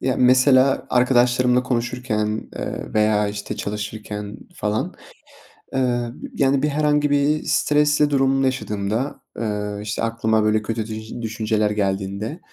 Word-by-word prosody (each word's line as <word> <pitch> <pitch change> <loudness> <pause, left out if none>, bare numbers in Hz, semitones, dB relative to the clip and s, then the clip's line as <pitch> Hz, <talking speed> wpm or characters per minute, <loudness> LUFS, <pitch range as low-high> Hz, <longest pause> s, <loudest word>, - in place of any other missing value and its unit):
Ya, 130 -1 0
mesela 130 +1 +4
arkadaşlarımla 125 0 +3
konuşurken, 120 -3 -2
ııı, - - -5
veya, 105 -1 +3
işte, 100 0 -5
çalışırken 105 0 -5 0.2
falan, 105 -7 -2 0.8
ııı, 120 -2 0 0.2
yani, 135 0 +2
bir - - +3
herhangi 150 0 +2
bir 145 +2 +2
stresli 150 0 +2
durum 135 -1 +2
yaşadığımda, 115 0 -2 0.2
ııı, 105 -2 -3
işte, 105 +1 -3
aklıma 110 -1 +1
böyle 110 0 +2
kötü 110 0 -3
düj 110 0 -7
düşünceler 110 -1 0
geldiğinde, 100 - -2
115 Hz, 120 wpm, -22 LUFS, 105-130 Hz, 0.8 s, mesela